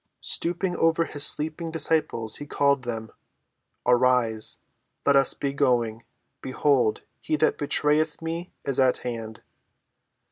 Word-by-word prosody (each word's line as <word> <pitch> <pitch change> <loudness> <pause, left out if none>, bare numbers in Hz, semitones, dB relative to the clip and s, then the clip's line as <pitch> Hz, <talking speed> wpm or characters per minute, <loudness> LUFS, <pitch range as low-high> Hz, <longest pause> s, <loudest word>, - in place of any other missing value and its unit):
Stooping 175 +1 +1
over 165 0 +2
his 145 -2 +1
sleeping 155 +2 -1
disciples 160 -8 +1
he 145 - -9
called 140 -1 +1
them: 110 -2 -5 0.7
"Arise, 125 -3 +2 0.5
let 140 - +4
us 135 0 +3
be 140 -1 -3
going: 120 -5 0 0.4
behold, 130 -3 0 0.2
he 155 - -2
that 155 +1 0
betrayeth 150 +1 +1
me 165 +2 -5
is 135 -2 -2
at 130 -1 +3
hand." 115 -2 -6
140 Hz, 120 wpm, -25 LUFS, 120-155 Hz, 0.7 s, let